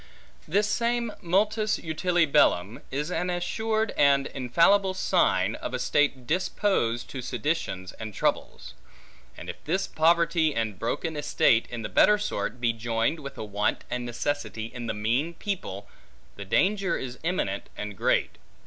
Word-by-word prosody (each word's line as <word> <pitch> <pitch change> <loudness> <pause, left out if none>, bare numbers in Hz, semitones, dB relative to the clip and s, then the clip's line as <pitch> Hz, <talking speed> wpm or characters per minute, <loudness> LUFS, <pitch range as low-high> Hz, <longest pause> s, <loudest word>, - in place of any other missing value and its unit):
This 205 +6 +2
same 235 +1 0
multis 210 +4 +1
utile 170 +2 +1
bellum, 115 - +2
is 150 +5 -3
an 180 +1 -1
assured 220 +5 -1
and 140 -1 +4
infallible 170 +10 +2
sign, - - +2
of - - -5
a - - 0
state 140 -4 +1
disposed 170 - 0
to 130 - -5
seditions 125 - -2
and 110 -1 -5
troubles. - - -2 0.6
And - - -9
if - - -8
this 185 +5 0
poverty 165 -1 +2
and 110 -4 -2
broken 160 +7 -2
estate 145 -5 +2
in 120 -2 -5
the - - -2
better 210 - +5
sort, 125 - -3
be 120 -1 +1
joined 115 +6 -1
with 140 -2 -8
a - - -4
want 105 0 -1
and 125 0 -2
necessity 120 -2 -3
in 120 -1 -6
the 110 - -2
mean 120 +11 0
people, 135 - -5 0.5
the 100 - -7
danger 195 - +1
is 125 -1 -6
imminent 130 - -2
and 105 -1 -5
great. - - 0
145 Hz, 150 wpm, -27 LUFS, 115-180 Hz, 0.6 s, better